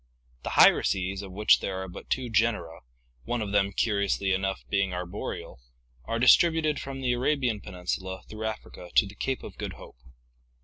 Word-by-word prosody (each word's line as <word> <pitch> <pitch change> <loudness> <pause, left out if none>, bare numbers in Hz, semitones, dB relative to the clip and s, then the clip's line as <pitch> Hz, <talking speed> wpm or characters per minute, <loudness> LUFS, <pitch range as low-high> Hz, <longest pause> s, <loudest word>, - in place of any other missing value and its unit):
The - - -4
hyraces, 95 +1 +4
of 100 -2 -9
which 105 +3 +4
there 95 -1 -3
are - - -7
but 90 - -11
two 130 -1 -1
genera, 105 -7 0 0.4
one 120 - -2
of 105 -2 -3
them, 100 -1 +2
curi 100 +1 +1
ously 95 -1 0
enough, 95 0 -2
being 100 -2 0
arboreal, 90 -7 -6 0.5
are 115 - -2
distributed 155 +4 +4
from 135 0 -6
the 125 -2 +1
Arabian 125 -4 0
Peninsula 95 +1 -5
through 110 0 -6
Africa 105 -4 -7
to - - +6
the 100 - -9
Cape 130 +5 -3
of - - -10
Good - - -4
Hope. - - -14
100 Hz, 175 wpm, -27 LUFS, 95-120 Hz, 0.5 s, to